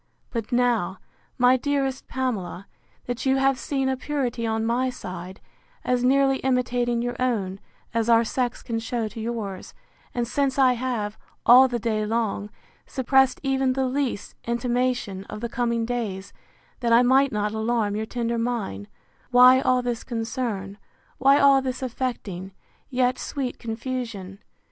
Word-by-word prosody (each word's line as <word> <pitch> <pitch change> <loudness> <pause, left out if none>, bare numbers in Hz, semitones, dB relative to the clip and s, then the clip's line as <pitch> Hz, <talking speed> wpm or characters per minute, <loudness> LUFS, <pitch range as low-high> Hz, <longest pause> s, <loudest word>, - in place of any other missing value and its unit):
—But 230 -3 -4
now, 240 -7 +1 0.4
my 250 +1 +5
dearest 270 0 -1
Pamela, 215 -8 -3 0.4
that 245 -1 -4
you 265 - +4
have 270 -1 +2
seen 270 -2 -1
a 265 - +1
purity 255 -4 -2
on 220 0 0
my 245 +3 +1
side, 185 -5 -7 0.5
as 250 -1 +1
nearly 270 +1 +4
imitating 245 -2 0
your 245 0 -2
own, 200 -7 -1 0.3
as 230 0 0
our 230 0 +6
sex 245 +1 -2
can 230 -2 -2
shew 225 0 -2
to 225 - -8
yours; 220 -5 -5 0.4
and 240 -1 0
since 275 +2 0
I 260 -2 +5
have, 235 -4 -3 0.3
all 255 +2 +8
the 245 -2 -2
day 220 -2 -1
long, 210 -2 -1 0.4
suppressed 265 0 +2
even 265 -1 +1
the 265 0 0
least 260 -4 -2
intimation 240 -4 -1
of 210 - -7
the 235 +1 -4
coming 235 -1 0
days, 215 -5 -4 0.5
that 235 -2 0
I 235 +2 +7
might 265 +2 +4
not 210 0 -1
alarm 220 -2 0
your 220 +1 -3
tender 235 -1 -2
mind; 220 - -3 0.4
why 250 +1 +7
all 255 -1 +2
this 240 -2 -2
concern, 225 -4 -4 0.4
why 275 +1 +6
all 275 -1 +6
this 260 0 -4
affecting, 220 -7 -4 0.4
yet 250 -1 +1
sweet 270 -4 -4
confusion? 225 -5 -5
240 Hz, 150 wpm, -25 LUFS, 220-255 Hz, 0.5 s, all